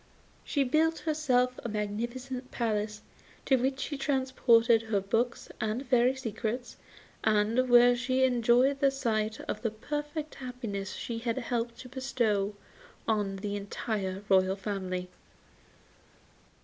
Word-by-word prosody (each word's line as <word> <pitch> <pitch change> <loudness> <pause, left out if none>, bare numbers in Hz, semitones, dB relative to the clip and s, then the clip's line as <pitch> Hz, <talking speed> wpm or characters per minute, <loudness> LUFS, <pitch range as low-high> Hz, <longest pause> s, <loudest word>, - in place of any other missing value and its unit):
She 280 - +1
built 315 +5 +2
herself 255 -6 +1
a 235 - -3
magnificent 240 +5 -4
palace, 215 -2 -2 0.4
to 270 - +4
which 265 +1 0
she 285 +1 -4
transported 260 -5 +3
her 220 -3 0
books 225 +5 -1
and 220 +5 -1
fairy 250 +1 +3
secrets, 240 -1 -4 0.5
and 220 +4 +2
where 245 0 +7
she 255 +2 +1
enjoyed 250 +2 +3
the 275 - +5
sight 225 -5 -1
of 210 - -4
the 230 - 0
perfect 295 +7 -4
happiness 225 -7 -5
she 230 -1 -4
had 230 0 -2
helped 235 -2 -2
to 255 - -10
bestow 235 -6 0 0.5
on 205 -3 +1
the 200 +1 -4
entire 200 -1 -3
royal 190 0 +4
family. 185 -2 -3
235 Hz, 125 wpm, -30 LUFS, 210-260 Hz, 0.5 s, where